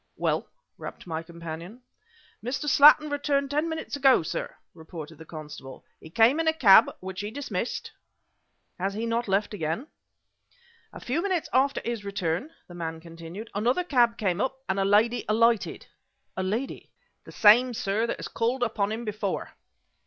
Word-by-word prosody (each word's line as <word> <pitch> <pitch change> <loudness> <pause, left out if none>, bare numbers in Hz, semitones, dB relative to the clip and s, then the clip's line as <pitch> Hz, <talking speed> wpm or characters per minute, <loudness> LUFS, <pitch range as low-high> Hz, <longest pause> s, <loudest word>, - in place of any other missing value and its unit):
"Well?" - - 0 0.3
rapped - - -8
my 160 -2 -4
companion. 170 +6 -9 0.6
"Mr. 265 +5 -3
Slattin 300 +1 +7
returned 280 -1 0
ten 300 +3 0
minutes 320 -2 -4
ago, 270 -9 +4
sir," 160 - -4 0.2
reported 160 -1 -10
the 160 - -10
constable. 150 -4 -10
"He 160 - -12
came 230 - +4
in 325 - 0
a 320 - +4
cab 225 -12 +7
which 190 0 -6
he 205 - -4
dismissed 235 -4 -4 0.4
" - - -48
"He - - -6
has 195 +1 -1
not 230 +2 -1
left 200 +2 0
again?" 165 - -3 1.1
"A - - -10
few 275 +7 -2
minutes 370 -4 -1
after 275 +2 +2
his 235 -3 -3
return," 195 - -2 0.2
the 175 - -12
man 165 -2 -5
continued, 170 +6 -10
"another 240 - +1
cab 240 -8 +2
came 195 -3 0
up, 265 0 -1
and 190 +1 0
a 195 - +2
lady 220 +4 +3
alighted." 230 0 +2 0.5
"A 190 - -2
lady!" 220 +8 -3 0.4
"The - - -11
same, 240 +5 +6
sir, 215 +3 0
that - - -3
has - - -6
called 245 +2 -1
upon 210 -3 -1
him 230 +2 -4
before." 210 -2 -3
215 Hz, 165 wpm, -26 LUFS, 180-255 Hz, 1.1 s, Slattin